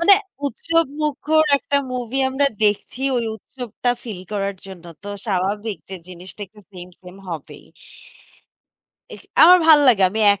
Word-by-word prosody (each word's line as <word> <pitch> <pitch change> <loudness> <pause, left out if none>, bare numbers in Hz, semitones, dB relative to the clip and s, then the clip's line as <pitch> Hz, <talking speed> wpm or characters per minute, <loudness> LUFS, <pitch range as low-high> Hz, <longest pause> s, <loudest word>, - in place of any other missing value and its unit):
মানে 390 +4 +7 0.3
উৎসবমুখর 310 0 0
একটা 280 - -1 0.2
মুভি 250 +1 -3
আমরা 275 +2 +1 0.2
দেখছি 210 +4 -1 0.2
ওই 235 - 0
উৎসবটা 245 +2 -5
ফিল 210 -7 -7
করার 200 -1 -2
জন্য। 180 -3 -11 0.2
তো 205 - -8 0.2
স্বাভাবিক 205 +2 -2
যে 190 - -5
জিনিসটা 185 +3 -12
একটু 210 +2 -19
সেম, 180 -1 -10
সেম, 180 0 -12
হবেই। 160 -4 -8 1.5
এখ - - -14 0.2
আমার 360 +3 +9
ভাল 310 -2 +8
লাগে। 205 -6 +4
আমি 220 +2 -3
এক 200 - -4
220 Hz, 145 wpm, -20 LUFS, 190-280 Hz, 1.5 s, আমার